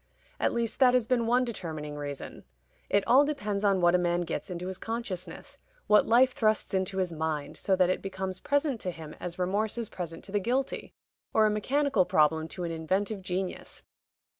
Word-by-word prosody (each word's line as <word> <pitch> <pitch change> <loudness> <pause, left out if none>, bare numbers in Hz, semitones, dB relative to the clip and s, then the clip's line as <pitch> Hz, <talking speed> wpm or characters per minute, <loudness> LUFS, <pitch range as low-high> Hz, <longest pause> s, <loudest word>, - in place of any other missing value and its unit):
At - - +2
least 235 -1 -1
that 255 -2 +6
has 250 -3 +3
been 235 -1 +1
one 250 +2 +3
determining 160 -9 -5
reason. 145 -1 -6 0.5
It 200 - +3
all 265 +4 +6
depends 210 -9 -2
on 195 -2 +3
what 175 0 +5
a 180 - +4
man 175 0 +1
gets 170 +2 -4
into 180 0 -5
his 185 0 -5
consciousness 190 -7 -6 0.3
what 210 - +5
life 250 +2 +5
thrusts 215 -3 +1
into 190 0 -1
his 185 -3 0
mind, 155 -2 -3
so 190 - +1
that 185 -1 +3
it - - -2
becomes 190 -1 -4
present 285 -4 0
to 185 - -2
him 160 -3 -8
as 175 -1 -6
remorse 200 +5 -1
is 230 -3 -3
present 170 -2 -6
to 195 - -11
the 205 - +1
guilty, 250 +7 -2 0.4
or 220 - +6
a 215 - +3
mechanical 260 0 +1
problem 160 -3 +2
to 180 +2 -6
an 170 - -2
inventive 190 +6 -1
genius. 185 0 -4
190 Hz, 195 wpm, -29 LUFS, 175-230 Hz, 0.5 s, that